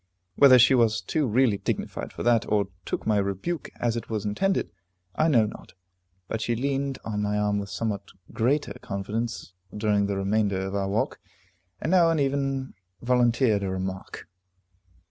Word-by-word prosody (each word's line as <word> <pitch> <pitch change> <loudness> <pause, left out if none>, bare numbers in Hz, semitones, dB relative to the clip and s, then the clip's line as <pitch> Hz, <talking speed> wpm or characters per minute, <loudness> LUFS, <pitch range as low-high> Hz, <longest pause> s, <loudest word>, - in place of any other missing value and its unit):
Whether 130 0 +8
she 125 +2 +6
was 115 -3 +3
too 150 +3 -1
really 115 -2 +2
dignified 100 - -3
for - - -6
that, 120 -2 +2
or 100 -2 +2 0.2
took - - -3
my 110 -1 +2
rebuke 100 - -2
as 120 -1 0
it 115 - -5
was 110 -2 -3
intended, 190 - 0 0.4
I 155 - +2
know 120 -9 +4
not, 105 - -9 0.5
but 110 - -3
she 120 +1 0
leaned 135 +2 -1
on 105 -2 -2
my 105 0 0
arm 105 0 +1
with 100 0 -5
somewhat 100 0 -3 0.2
greater 140 +6 +1
confidence 105 +1 -4 0.2
during 105 -1 +1
the 100 -1 -2
remainder 100 0 0
of 95 - -5
our 100 -1 -1
walk, 105 +3 -1 0.6
and 160 - -2
now 175 -3 +5
and 165 - +1
then 140 - +3
even 135 -1 -2 0.3
volunteered 120 -3 +3
a 100 - -2
remark. 95 0 -5
110 Hz, 170 wpm, -26 LUFS, 100-130 Hz, 0.6 s, Whether